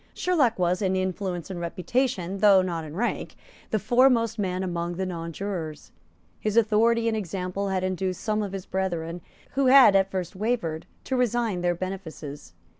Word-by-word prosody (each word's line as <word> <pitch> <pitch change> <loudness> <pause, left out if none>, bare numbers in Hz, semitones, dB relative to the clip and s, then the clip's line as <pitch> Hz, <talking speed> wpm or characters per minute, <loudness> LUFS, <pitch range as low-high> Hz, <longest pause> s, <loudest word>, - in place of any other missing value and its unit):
Sherlock 295 -11 +2
was, 180 +1 +1
in 190 -1 +1
influence 185 -1 -2
and 180 - -5
reputation, 190 +2 -1
though 195 -2 +6
not 170 -3 -3
in 155 0 -8
rank, 235 +6 -2 0.3
the 220 - +1
foremost 235 0 +3
man 185 -2 -1
among 175 -1 -3
the 190 +2 -2
nonjurors. 170 -2 -5 0.5
His 215 +1 -1
authority 230 +1 +3
and 225 - +1
example 195 0 -3
had 190 -1 -1
induced 185 -1 -2
some 215 -1 0
of 205 -2 -3
his 195 -1 -6
brethren, 175 -3 -3 0.3
who 275 0 +1
had 255 -6 +8
at 195 0 +4
first 185 -1 -4
wavered, 190 -7 -2 0.2
to 265 - -2
resign 235 -6 0
their 175 0 +1
benefices. 160 - -7
190 Hz, 165 wpm, -26 LUFS, 175-220 Hz, 0.5 s, had